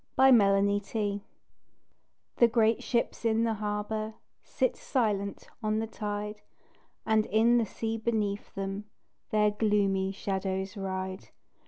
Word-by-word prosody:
AT 265 -1 +8
PORTSMOUTH 200 0 +2 1.2
The 235 - +7
great 225 -1 +2
ships 235 -1 -1
in 225 0 +2
the 230 -1 +1
harbour 215 +1 -3 0.3
Sit - - 0
silent 205 -6 -1
on 215 -1 0
the 220 - 0
tide, 210 -1 -5 0.6
And 220 -1 +2
in 235 +3 +4
the 225 - 0
sea 225 +3 -3
beneath 215 -3 -2
them 195 +1 -4 0.4
Their 210 -1 +3
gloomy 200 -2 +1
shadows 190 -1 -3
ride. 190 -1 -4
210 Hz, 120 wpm, -29 LUFS, 200-225 Hz, 1.2 s, AT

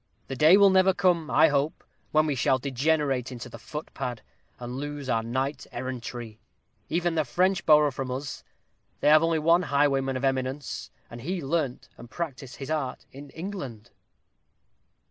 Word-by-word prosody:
The 135 - -3
day 155 +8 +7
will 200 -1 +6
never 190 0 +4
come, 175 -3 +2
I 160 - +5
hope, 145 +1 -1 0.3
when 155 0 +4
we 150 - 0
shall 130 0 +2
degenerate 135 -1 0
into 125 0 -7
the 115 - -10
footpad, 125 -2 -6 0.4
and 125 +1 -6
lose 145 -1 -5
our 115 -3 +1
Night 130 +5 -3
Errantry. 120 -3 -6 0.5
Even 175 +1 0
the 160 -1 +1
French 185 +7 +1
borrow 150 -2 +6
from 130 0 -5
us 130 +2 -5 0.6
they - - +4
have 155 0 +7
only 165 0 +2
one 165 +3 +4
highwayman 135 -4 +1
of 130 - -2
eminence, 130 0 -2 0.2
and 120 0 -8
he 180 +7 -3
learnt 145 -3 -2
and 120 - -12
practised 135 -5 -6
his 135 +2 -6
art 145 -5 -3
in 140 +1 -11
England." 140 - -7
140 Hz, 165 wpm, -27 LUFS, 130-160 Hz, 0.6 s, day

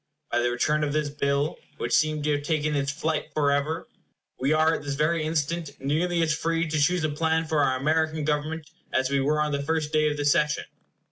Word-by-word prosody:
By 120 - +2
the 120 0 +2
return 150 +5 +1
of 145 -1 -1
this 150 -1 0
bill, 140 +1 0 0.2
which - - -3
seemed 155 -1 +2
to 150 - +1
have 145 -1 0
taken 150 0 0
its 140 0 0
flight 160 +1 -2
forever, 145 +2 +1 0.5
we 135 +3 +1
are 155 +1 +4
at - - -2
this 145 -1 -3
very 155 +3 +1
instant 160 0 -2
nearly 165 +5 +1
as 155 -2 +2
free 165 +2 0
to 155 0 0
choose 175 +3 +2
a 155 - +1
plan 160 +2 0
for 155 -1 0
our 130 -2 +2
American 155 +2 0
Government 155 +1 -2 0.2
as 130 +1 +1
we 140 - +2
were 150 +3 +1
on 150 0 +1
the 140 0 -1
first 155 +1 -1
day 155 0 +3
of 150 - -3
the 145 - -2
session. 150 +1 +2
150 Hz, 220 wpm, -26 LUFS, 145-160 Hz, 0.5 s, are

